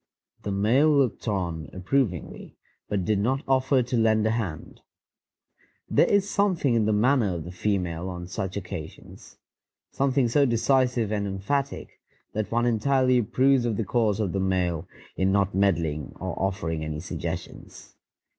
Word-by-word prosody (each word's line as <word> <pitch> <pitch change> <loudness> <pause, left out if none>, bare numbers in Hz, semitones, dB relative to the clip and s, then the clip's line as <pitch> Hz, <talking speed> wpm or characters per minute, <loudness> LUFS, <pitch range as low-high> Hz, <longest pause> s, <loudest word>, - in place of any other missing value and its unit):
The 100 - -4
male 115 +10 +3
looked 140 -6 +1
on 85 -6 -2
approvingly, 95 - -2 0.3
but 100 -3 -1
did 105 0 +1
not 130 +7 0
offer 130 0 +3
to 125 +1 -2
lend 110 -1 +3
a 110 - +2
hand. 105 -9 -4 1.1
There - - +4
is 200 -1 +3
something 190 -10 +1
in 115 -2 +2
the 110 - +2
manner 110 -2 +2
of 80 - -5
the 85 - -8
female 90 -2 -2
on 90 -1 -6
such 95 +1 -4
occasions, 90 -5 -9 0.5
something 135 -2 +1
so 140 +4 +3
decisive 125 -1 +1
and 100 -1 -1
emphatic, 135 +9 -3 0.3
that 110 -1 -3
one 120 +1 +1
entirely 130 +2 +2
approves 130 +3 +2
of 115 -4 -1
the 115 - -1
course 110 -3 +1
of 100 -5 0
the 100 - -2
male 90 -3 0 0.3
in 95 +1 +2
not 100 0 +1
meddling 85 -6 0
or 95 -2 -4
offering 80 -5 -2
any 75 -1 -4
suggestions. 85 0 -7
105 Hz, 155 wpm, -26 LUFS, 95-125 Hz, 1.1 s, There